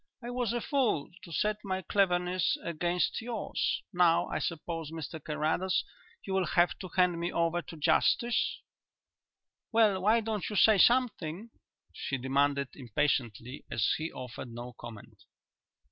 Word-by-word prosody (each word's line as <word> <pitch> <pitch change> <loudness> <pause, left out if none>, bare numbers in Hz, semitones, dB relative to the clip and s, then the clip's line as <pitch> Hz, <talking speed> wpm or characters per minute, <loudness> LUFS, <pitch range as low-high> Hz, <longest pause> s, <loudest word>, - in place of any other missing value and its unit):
I 240 - -5
was 245 -3 -1
a 240 0 -1
fool 245 - 0
to 170 - -12
set 210 +6 0
my 190 -2 -2
cleverness 180 -1 +1
against 175 +4 -1
yours. 230 -2 -2
Now, 175 -1 +4
I - - -2
suppose, 165 -1 -4
Mr 160 -1 -7
Carrados, 155 +4 0 0.4
you 195 - -4
will 190 -2 +1
have 175 0 +3
to 185 - -6
hand 180 -2 +3
me 170 +1 -2
over 170 +1 +1
to 165 - -11
justice? 235 +9 +2 1.1
"Well; 215 -4 +4
why 220 +4 +4
don't 215 -2 -3
you 210 - -5
say 210 0 +6
something?" 225 -5 +2 0.4
she 135 - -3
demanded 140 +1 +1
impatiently, 125 -1 -2
as 105 - +1
he 160 +1 -3
offered 125 0 -7
no 120 +1 -7
comment. 115 -3 -11
175 Hz, 145 wpm, -30 LUFS, 150-205 Hz, 1.1 s, say